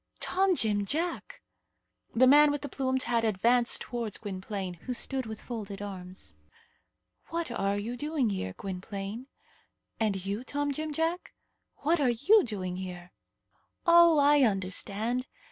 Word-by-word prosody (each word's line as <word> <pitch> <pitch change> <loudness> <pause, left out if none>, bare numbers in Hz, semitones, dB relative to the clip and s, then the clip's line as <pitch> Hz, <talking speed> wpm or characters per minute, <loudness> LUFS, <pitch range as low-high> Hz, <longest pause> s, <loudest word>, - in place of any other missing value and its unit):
"Tom 380 0 +2
Jim 210 -7 0
Jack!" 325 - -3 0.7
The 255 +3 +6
man 295 +3 +7
with 290 0 -2
the 285 - -4
plumed 260 0 -1
hat 235 -1 +1
advanced 235 +3 +2
towards 235 -4 -4
Gwynplaine, 195 -2 -5
who 250 - -2
stood 265 -1 -2
with 220 -1 -7
folded 210 -5 -6
arms. 190 -2 -8 0.9
"What 335 -5 -3
are 200 -2 0
you 225 +4 -4
doing 290 -3 0
here, 95 - -3
Gwynplaine?" 195 - -6 0.7
"And 200 -4 0
you, 200 +4 -3
Tom 285 +2 -2
Jim 310 +2 -4
Jack, 325 +4 -2 0.5
what 325 +3 +3
are 275 -4 +3
you 285 - +5
doing 185 - -4
here?" 180 -1 -7 0.7
"Oh! 340 -1 +7
I 290 0 +5
understand. 210 +3 0
235 Hz, 140 wpm, -29 LUFS, 200-285 Hz, 0.9 s, man